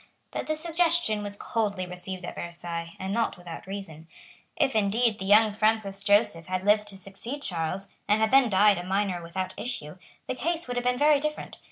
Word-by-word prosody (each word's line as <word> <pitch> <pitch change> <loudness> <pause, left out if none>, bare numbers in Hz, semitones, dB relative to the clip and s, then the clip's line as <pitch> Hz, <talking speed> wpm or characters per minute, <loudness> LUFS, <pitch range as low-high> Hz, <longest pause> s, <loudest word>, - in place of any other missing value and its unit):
But - - -4
this 310 0 -2
suggestion 335 -9 +1
was 205 0 -5
coldly 205 -5 -1
received 180 +1 -6
at - - -5
Versailles, 170 -1 -6
and 190 +1 -3
not 230 -3 0
without 175 0 -9
reason. 190 -5 -7 0.5
If, 280 -7 +1
indeed, 215 +2 +2
the 190 - -4
young 210 +1 +6
Francis 210 -2 +1
Joseph 205 -5 +3
had 185 +1 -2
lived 210 0 +4
to 195 -2 -6
succeed 230 +9 -7
Charles, 180 - -2 0.2
and 210 +1 +3
had 220 0 +2
then 265 -2 +6
died 200 -1 +5
a - - -5
minor 190 -1 0
without 185 +2 -4
issue, 185 -9 -4 0.3
the - - -1
case 330 +5 -2
would 245 - -3
have 245 - -1
been 250 0 +2
very 295 +1 +5
different. 305 +1 -4
205 Hz, 195 wpm, -27 LUFS, 185-245 Hz, 0.5 s, young